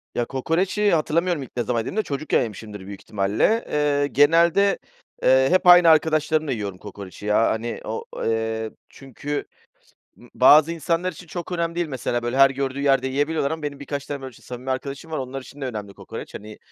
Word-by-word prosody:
Ya, 120 Hz, -, 0 dB
kokoreci 180 Hz, -, 0 dB
hatırlamıyorum 165 Hz, 0 st, +1 dB
ilk 125 Hz, -, -12 dB
ne 120 Hz, -, +1 dB
zaman 120 Hz, -1 st, -1 dB
yediğimi 115 Hz, -, -4 dB
de 215 Hz, -, +2 dB
çocukken 145 Hz, +2 st, 0 dB
yemişimdir 105 Hz, -3 st, -7 dB
büyük 100 Hz, -1 st, -9 dB
ihtimalle. 105 Hz, -, 0 dB
Eee, 145 Hz, -1 st, +1 dB
genelde, 170 Hz, +7 st, +4 dB, 0.4 s
eee, 130 Hz, +1 st, +5 dB
hep 185 Hz, 0 st, +2 dB
aynı 175 Hz, -1 st, +9 dB
arkadaşlarımla 155 Hz, -1 st, +2 dB
yiyorum 100 Hz, -5 st, -4 dB
kokoreci 100 Hz, +1 st, -10 dB
ya. 105 Hz, +2 st, +3 dB
Hani, 115 Hz, +1 st, -3 dB
o, 110 Hz, +1 st, -4 dB, 0.2 s
eee, 110 Hz, -1 st, -1 dB, 0.2 s
çünkü, 140 Hz, +2 st, -6 dB, 0.7 s
ımm, 120 Hz, -, -17 dB
bazı 150 Hz, +5 st, +6 dB
insanlar 170 Hz, +3 st, -1 dB
için 180 Hz, -, -13 dB
çok 170 Hz, +2 st, -6 dB
önemli 170 Hz, -1 st, -1 dB
değil. 175 Hz, 0 st, -1 dB
Mesela, 125 Hz, -4 st, -2 dB
böyle, 120 Hz, +2 st, -2 dB
her 135 Hz, 0 st, +7 dB
gördüğü 135 Hz, 0 st, -3 dB
yerde 135 Hz, -2 st, +2 dB
yiyebiliyorlar 145 Hz, +2 st, 0 dB
ama 160 Hz, -1 st, -4 dB
benim 145 Hz, -1 st, -5 dB
birkaç 140 Hz, 0 st, -5 dB
tane, 145 Hz, -1 st, -5 dB
böyle, 130 Hz, -1 st, -7 dB
ç -, -, -18 dB
samimi 125 Hz, +1 st, -6 dB
arkadaşım 140 Hz, +4 st, -4 dB
var, 155 Hz, -, -2 dB
onlar 135 Hz, +1 st, -5 dB
için 140 Hz, +2 st, -13 dB
de 135 Hz, -, -3 dB
önemli 105 Hz, -5 st, -6 dB
kokoreç. -, -, -9 dB
Hani, 105 Hz, +1 st, -9 dB
140 Hz, 190 wpm, -23 LUFS, 120-160 Hz, 0.7 s, aynı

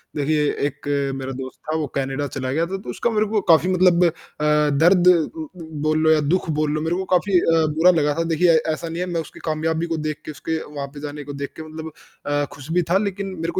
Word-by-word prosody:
देखिए 150 Hz, +1 st, +1 dB, 0.2 s
एक 145 Hz, -, -9 dB, 0.3 s
मेरा 135 Hz, 0 st, -5 dB
दोस्त 130 Hz, -1 st, -7 dB
था, 155 Hz, -, 0 dB
वो 155 Hz, -2 st, -2 dB
कनाडा 135 Hz, +1 st, -1 dB
चला 130 Hz, -1 st, -2 dB
गया 160 Hz, +5 st, +1 dB
था 190 Hz, +2 st, -3 dB
तो -, -, -9 dB
उसका 235 Hz, -, -1 dB
मेरे 215 Hz, -2 st, +1 dB
को 210 Hz, 0 st, 0 dB
काफ़ी 165 Hz, +3 st, +5 dB
मतलब 180 Hz, -1 st, +4 dB
अ, -, -, +5 dB, 0.7 s
दर्द 180 Hz, +1 st, +5 dB, 0.3 s
उम, 320 Hz, -1 st, -6 dB, 0.4 s
बोल 155 Hz, 0 st, +2 dB
लो 160 Hz, -, +5 dB
या 155 Hz, -, +5 dB
दुःख 185 Hz, -2 st, 0 dB
बोल 155 Hz, -1 st, +1 dB
लो, 155 Hz, 0 st, -1 dB
मेरे 160 Hz, +2 st, 0 dB
को 190 Hz, +1 st, -2 dB
काफ़ी 185 Hz, 0 st, +3 dB
अ, 165 Hz, -1 st, +3 dB
बुरा 175 Hz, +3 st, +6 dB
लगा 145 Hz, 0 st, +2 dB
था। -, -, +2 dB
देखिए 170 Hz, +1 st, +4 dB, 0.2 s
ऐसा 165 Hz, +1 st, -5 dB
नहीं 165 Hz, +1 st, -5 dB
है -, -, 0 dB
मैं 165 Hz, -, +1 dB
उसकी 155 Hz, -, -12 dB
कामयाबी 160 Hz, +1 st, -1 dB
को -, -, -1 dB
देख 150 Hz, 0 st, -6 dB
के 155 Hz, -, -5 dB
उसके 160 Hz, +2 st, -3 dB
वहाँ 140 Hz, -1 st, -4 dB
पे 145 Hz, -, -9 dB
जाने 145 Hz, 0 st, -6 dB
को 145 Hz, +1 st, -7 dB
देख 140 Hz, -, -6 dB
के 160 Hz, -, -7 dB
मतलब 160 Hz, 0 st, -7 dB, 0.3 s
अ, 145 Hz, 0 st, 0 dB
खुश 145 Hz, +1 st, -11 dB
भी 175 Hz, +1 st, +2 dB
था, 185 Hz, -, +5 dB
लेकिन 200 Hz, -1 st, -3 dB
मेरे 165 Hz, +1 st, -2 dB
160 Hz, 245 wpm, -22 LUFS, 150-180 Hz, 0.7 s, बुरा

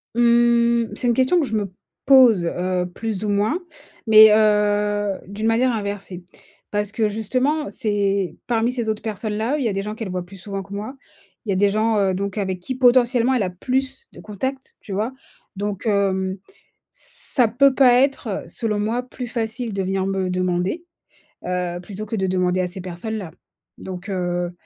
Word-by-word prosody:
Mmh, 235 Hz, 0 st, +4 dB
c'est 250 Hz, -, -1 dB
une 240 Hz, -, +4 dB
question 260 Hz, +9 st, +3 dB
que 305 Hz, -, +1 dB
je 225 Hz, -, -3 dB
me 200 Hz, -3 st, -2 dB, 0.3 s
pose 250 Hz, -9 st, +6 dB
heu, 180 Hz, +1 st, -1 dB
plus 220 Hz, -3 st, -3 dB
ou 210 Hz, -, -1 dB
moins 210 Hz, -, +1 dB, 0.5 s
mais 220 Hz, 0 st, +9 dB
heu, 205 Hz, -1 st, +2 dB
d'une 205 Hz, +2 st, -5 dB
manière 235 Hz, +3 st, +3 dB
inversée, 200 Hz, -4 st, -5 dB, 0.5 s
parce 205 Hz, 0 st, -1 dB
que 220 Hz, -1 st, 0 dB
justement, 255 Hz, +8 st, -1 dB
c'est 200 Hz, -5 st, -1 dB
parmi 235 Hz, 0 st, +1 dB
ces 235 Hz, -3 st, -3 dB
autres 215 Hz, -1 st, -3 dB
personnes-là 220 Hz, +4 st, -2 dB
où -, -, -2 dB
il 255 Hz, -, -1 dB
y -, -, +2 dB
a -, -, -2 dB
des 195 Hz, 0 st, -2 dB
gens 210 Hz, +1 st, -4 dB
qu'elles 220 Hz, -3 st, -6 dB
voient 180 Hz, -1 st, -4 dB
plus 195 Hz, +2 st, -13 dB
souvent 195 Hz, +1 st, -6 dB
que 200 Hz, +1 st, -11 dB
moi, 215 Hz, +7 st, -5 dB, 0.5 s
il 210 Hz, -, -7 dB
y -, -, +3 dB
a -, -, -1 dB
des 205 Hz, +2 st, +3 dB
gens, 215 Hz, +1 st, +1 dB
heu, 195 Hz, -1 st, +2 dB
donc 200 Hz, +1 st, -3 dB
avec 190 Hz, -2 st, -2 dB
qui 220 Hz, +9 st, -4 dB
potentiellement 250 Hz, 0 st, +4 dB
elle 230 Hz, -, +1 dB
a 180 Hz, -, -2 dB
plus 265 Hz, -, -3 dB
de -, -, -14 dB
contacts, 260 Hz, +6 st, -5 dB
tu 200 Hz, -, -8 dB
vois? 220 Hz, +6 st, -2 dB, 0.4 s
Donc 200 Hz, 0 st, -4 dB
hem, 195 Hz, -2 st, 0 dB, 0.5 s
ça 285 Hz, -, +1 dB
peut 265 Hz, +4 st, +4 dB
pas 260 Hz, -2 st, +6 dB
être- 250 Hz, -5 st, +1 dB
selon 210 Hz, +4 st, -2 dB
moi- 225 Hz, +4 st, -1 dB
plus 250 Hz, 0 st, -7 dB
facile 230 Hz, 0 st, -3 dB
de 195 Hz, -1 st, -1 dB
venir 190 Hz, 0 st, -1 dB
me 195 Hz, -1 st, -1 dB
demander, 180 Hz, -, -1 dB, 0.6 s
heu, 180 Hz, -1 st, -2 dB
plutôt 205 Hz, +3 st, -7 dB
que 220 Hz, -, -4 dB
de 190 Hz, -2 st, 0 dB
demander 185 Hz, 0 st, +1 dB
à 180 Hz, -, -1 dB
ces 180 Hz, +1 st, -6 dB
personnes-là. 185 Hz, 0 st, -5 dB, 0.5 s
Donc 185 Hz, +1 st, -7 dB
heu, 175 Hz, -2 st, -2 dB
210 Hz, 190 wpm, -22 LUFS, 190-235 Hz, 0.6 s, mais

